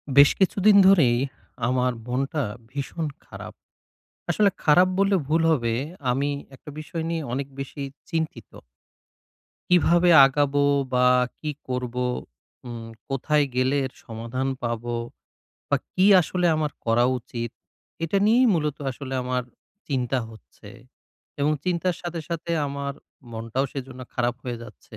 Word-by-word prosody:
বেশ 140 +1 +9
কিছুদিন 200 +2 +4
ধরেই 150 -12 +5 0.5
আমার 125 0 +2 0.2
মনটা 135 +4 -1 0.3
ভীষণ 145 +4 -4 0.2
খারাপ। - - -9 0.8
আসলে 200 +4 +4
খারাপ 180 +5 +6
বললে 195 0 +3
ভুল 160 +2 +2
হবে 120 -6 0 0.4
আমি 140 +3 0 0.2
একটা 140 - -11
বিষয় 155 +2 -5
নিয়ে 165 -1 -1
অনেক 135 +2 -2
বেশি 135 +1 -6 0.3
চিন্তিত। 160 -1 -3 1.2
কীভাবে 175 0 +4 0.2
আগাবো 145 +1 +1 0.3
বা 125 0 +4 0.3
কি 155 - -4 0.2
করবো 125 -1 -2 0.6
উম 115 -1 -7 0.2
কোথায় 145 +2 +1
গেলে 130 +2 +2
এর 130 - -7
সমাধান 115 +3 -4 0.2
পাবো 120 0 -2 0.7
বা - - +3 0.2
কি 185 - +2 0.2
আসলে 180 +1 0
আমার 155 -1 0
করা 115 +1 +3
উচিত। 120 -1 -6 0.5
এটা 165 +4 0
নিয়েই 240 +4 +5
মূলত 150 -3 -1
আসলে 135 0 -6
আমার 125 0 -1 0.5
চিন্তা 130 -2 0
হচ্ছে। 110 -1 -15 0.7
এবং 145 +2 +3
চিন্তার 180 -1 0
সাথে, 175 -1 -4
সাথে 170 0 -4 0.2
আমার 140 0 -4 0.4
মনটাও 115 +4 -2
সেজন্য 130 -2 -7
খারাপ 120 0 0
হয়ে 120 -2 -3
যাচ্ছে। - - -13
140 Hz, 125 wpm, -24 LUFS, 125-165 Hz, 1.2 s, বেশ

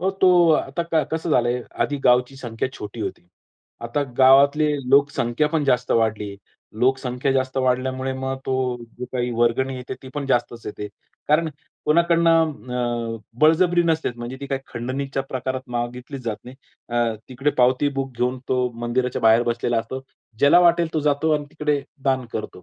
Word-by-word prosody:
हो 190 +2 +1
तो, 180 -3 +4
आता 160 +2 +1
कसं 160 +1 -2
झालं 120 -4 +3
आहे, 125 0 -1 0.2
आधी 145 - -1
गावची 125 +1 +3
संख्या 120 0 -4
छोटी 105 0 -8
होती. 90 - -5 0.5
आता 120 +5 -2 0.2
गावातली 140 +3 +6 0.2
लोकसंख्या 140 -1 +3
पण 155 -1 0
जास्त 125 -2 +1
वाढली 110 -2 +1
आहे. 100 - -9 0.4
लोकसंख्या 130 +1 +1
जास्त 130 -1 -1
वाढल्यामुळे 130 +1 0
मग 130 0 -3
तो 130 - 0 0.4
जे 125 - -4
काही 125 -1 -1
वर्गणी 120 +3 +1
येते 125 0 -6
ती 130 - -10
पण 145 -1 -3
जास्तच 120 -3 -1
येते. 105 0 -6 0.4
कारण 155 +2 +3 0.4
कोणाकडनं 150 -8 +1
अ, - - -12 0.2
बळजबरी 175 +3 +4
नसतेच 160 -7 0
म्हणजे 120 +2 -6
ती 140 - -5
काही 135 0 -2
खंडणीच्या 135 +3 -3
प्रकारात 130 0 -3
मागितलीच 125 +3 -4
जात 110 -3 -2
नाही. 125 +2 -11 0.3
अ, 120 -1 0
तिकडे 135 +3 0
पावती 130 +3 +4
बुक 135 -1 -3
घेऊन 125 +1 0
तो 125 -1 +1
मंदिराच्या 125 +1 -1
बाहेर 115 +1 +6
बसलेला 120 0 0
असतो. 115 +4 -5 0.4
ज्याला 140 +6 +6
वाटेल 170 -2 +3
तो 155 - +1
जातो 150 +2 +1
आणि 150 - -5
तिकडे 150 -2 -1 0.2
दान 130 -2 +1
करतो. 90 -4 -6
130 Hz, 165 wpm, -22 LUFS, 120-145 Hz, 0.5 s, गावातली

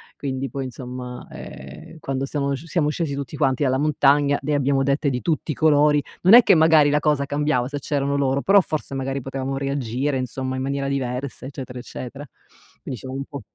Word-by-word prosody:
Quindi 135 -1 -3
poi 135 -1 -4
insomma, 125 -1 -7
ehm, 70 - -10
quando 135 -2 -2
siamo 140 0 -1
siamo 155 +2 -1
scesi 155 -2 -2
tutti 140 0 -5
quanti 135 -2 +1
dalla 130 -1 +2
montagna 145 -1 +3
ne 150 +2 -1
abbiamo 140 -1 +2
dette 140 +1 +1
di 125 -1 -2
tutti 160 -1 -1
i - - -1
colori. 150 0 +4 0.2
Non 185 +4 +6
è 240 +1 +10
che 195 - +5
magari 160 -2 +5
la 145 +1 +3
cosa 150 -2 +1
cambiava 145 -3 0
se 145 +1 -4
c'erano 140 0 -1
loro, 140 0 +1
però 200 +4 +5
forse 155 -5 -4
magari 135 +1 -2
potevamo 135 +1 -4
reagire 135 0 -1
insomma 130 +1 -3
in 130 - -3
maniera 140 +1 -2
diversa 130 -1 -3
eccetera 130 -2 -7
eccetera. 130 +3 -8 0.6
Quindi 125 - -6
diciamo 130 0 -7
un 135 - -4
po' 140 -1 -8
140 Hz, 195 wpm, -22 LUFS, 130-145 Hz, 0.6 s, è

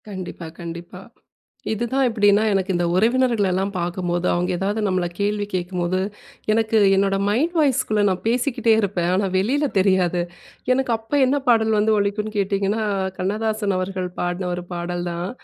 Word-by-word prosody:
கண்டிப்பா 185 -3 -7
கண்டிப்பா. 170 +2 -8 0.7
இதுதான் 240 +5 0
எப்டின்னா, 205 -2 +3
எனக்கு 195 -1 0
இந்த 175 0 +1
உறவினர்களெல்லாம் 205 -4 +2
பார்க்கும்போது, 175 0 -2
அவங்க 175 +1 0
ஏதாவது 200 +4 -1
நம்மள 185 -2 0
கேள்வி 205 0 0
கேட்கும்போது, 180 0 -1 0.5
எனக்கு 225 0 +2 0.2
என்னோட 195 0 +2
மைண்ட் 285 +12 +1
வாய்ஸ்க்குள்ள 255 -7 +2
நான் 185 -1 -2
பேசிக்கிட்டே 240 -1 +2
இருப்பேன். 180 -4 -1
ஆனா 200 +2 +1
வெளியில 265 +10 +1
தெரியாது. 185 -2 +2 0.5
எனக்கு 260 -1 0
அப்போ 225 +6 -5
என்ன 280 +3 +1
பாடல் 220 -2 +3
வந்து 215 +1 +3
ஒலிக்கும்னு 210 +1 -1
கேட்டீங்கன்னா, 200 +2 0 0.4
கண்ணதாசன் 210 +1 -1
அவர்கள் 185 0 -3
பாடின 180 +1 -2
ஒரு 175 - -6
பாடல் 175 0 -3
தான். 170 +2 -4
200 Hz, 140 wpm, -22 LUFS, 180-220 Hz, 0.7 s, எப்டின்னா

